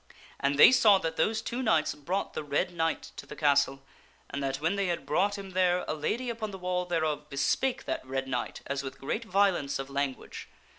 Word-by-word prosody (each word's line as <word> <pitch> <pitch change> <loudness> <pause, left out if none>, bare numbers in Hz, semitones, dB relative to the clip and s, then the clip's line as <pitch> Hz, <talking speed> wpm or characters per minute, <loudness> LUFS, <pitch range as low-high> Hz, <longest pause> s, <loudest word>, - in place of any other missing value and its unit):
And 140 0 +1
they 145 - +9
saw 215 -6 +6
that 165 -3 -3
those 220 +4 +1
two 245 +3 -3
knights 165 -11 +2
brought 175 +7 -3
the - - -4
Red 145 +4 -1
Knight 165 -1 -2
to - - -8
the - - -8
castle, 140 -2 +2 0.5
and 140 - -3
that 135 0 -2
when 165 +5 0
they 200 -1 0
had 170 -5 -2
brought 200 +8 +1
him 195 -1 -8
there 180 -1 +2
a - - -1
lady 220 +12 -2
upon 225 -2 -4
the 195 - -7
wall 180 -1 -1
thereof 155 -4 -1
bespake 145 - 0
that - - -3
Red 135 +1 -3
Knight 125 -2 -3
as 140 0 -2
with 135 -1 -8
great 215 +12 -3
violence 185 -9 +1
of 135 0 -6
language. 140 -1 -4
165 Hz, 210 wpm, -29 LUFS, 140-195 Hz, 0.5 s, they